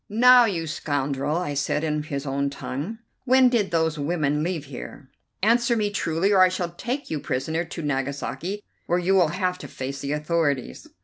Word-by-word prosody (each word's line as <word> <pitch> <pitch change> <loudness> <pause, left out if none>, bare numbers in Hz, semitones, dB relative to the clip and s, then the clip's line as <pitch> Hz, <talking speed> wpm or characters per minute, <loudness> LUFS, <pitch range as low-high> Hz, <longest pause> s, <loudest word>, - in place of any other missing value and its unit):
"Now, 245 +3 +7
you 175 -7 -1
scoundrel," 145 -2 -2
I 175 -5 -2
said 145 +2 -1
in 150 -1 0
his 145 -2 -5
own 140 0 -1
tongue, 145 - -5 0.3
"when 260 0 +6
did 225 -5 +1
those 160 -2 0
women 150 -1 0
leave 165 -2 -2
here? 135 0 -9 0.3
Answer 235 +2 +3
me 210 -1 0
truly, 185 -1 0
or 195 - +5
I 185 - +7
shall 180 -2 -3
take 250 +10 -4
you 155 - -1
prisoner 150 +6 -2
to 165 0 -7
Nagasaki, 145 +8 -3 0.2
where 175 - +2
you 180 +2 +1
will 185 -4 +5
have 180 +3 -1
to - - -8
face 135 +1 -6
the 140 +1 -2
authorities." 150 - -1
160 Hz, 185 wpm, -24 LUFS, 145-195 Hz, 0.3 s, Now